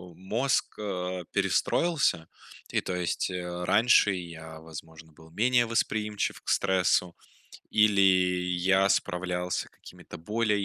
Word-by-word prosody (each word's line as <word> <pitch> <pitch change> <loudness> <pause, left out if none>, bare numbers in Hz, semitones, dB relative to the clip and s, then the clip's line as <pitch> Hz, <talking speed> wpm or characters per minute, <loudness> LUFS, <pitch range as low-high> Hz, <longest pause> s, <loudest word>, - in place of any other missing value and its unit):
мозг, 110 +9 -1
э, 90 -3 -4
перестроился, 140 - +1 0.5
и, - - +2
то 90 - -4
есть, 90 +2 -2
э, 90 -1 -5
раньше 105 +2 +4
я, 80 -3 -8
возможно, 80 0 -12
был 80 0 -17
менее 120 +5 +2
восприимчив 105 -2 -1
к - - -7
стрессу, 90 -1 +1 0.6
или 105 -2 +4
я 90 0 +3
справлялся 90 -1 -1
какими-то 90 -1 -13
более 105 +2 0
90 Hz, 115 wpm, -27 LUFS, 90-105 Hz, 0.6 s, раньше